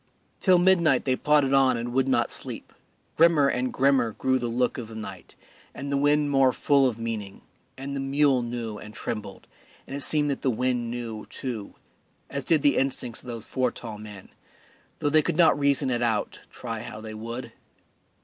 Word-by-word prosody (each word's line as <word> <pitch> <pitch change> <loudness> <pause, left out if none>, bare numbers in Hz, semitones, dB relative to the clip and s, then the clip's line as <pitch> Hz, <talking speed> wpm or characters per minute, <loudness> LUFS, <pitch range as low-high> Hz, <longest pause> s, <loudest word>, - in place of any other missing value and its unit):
Till 185 -2 +5
midnight 175 -3 +4
they 130 -2 +2
plodded 145 -1 +2
on 135 -2 +4
and 120 +1 -4
would 135 +1 +2
not 130 -3 +1
sleep; - - -6 0.4
grimmer 160 -3 +5
and 125 -1 -1
grimmer 130 -4 +2
grew 130 +3 0
the 120 - -2
look 125 +2 0
of 115 - -6
the 110 - -11
night, 110 - -9 0.4
and 140 +1 -5
the - - +1
wind 145 +1 +2
more 135 -2 +4
full 140 +2 +3
of 120 -3 -3
meaning, 110 -4 -5 0.3
and 140 +1 -5
the - - -2
mule 135 -1 +2
knew 115 -3 -5
and 105 0 -11
trembled, 105 -3 -6 0.4
and 135 - -7
it 140 - -4
seemed 150 0 +1
that 135 - -4
the 135 - +1
wind 125 0 -1
knew, 115 -3 -6
too, 120 -6 -6 0.6
as 140 -1 -3
did 155 +1 +2
the 145 -2 +4
instincts 125 -3 -1
of - - -15
those 115 -2 -5
four 130 -1 0
tall 110 -3 -8
men, 105 -3 -11 0.7
though 145 - 0
they 155 +1 +5
could 150 - -2
not 170 -4 +5
reason 140 -1 +2
it 120 -1 0
out, 110 -3 -1
try 115 -3 -6
how 105 - -8
they 110 0 -8
would. 115 +3 -6
130 Hz, 195 wpm, -26 LUFS, 115-140 Hz, 0.7 s, Till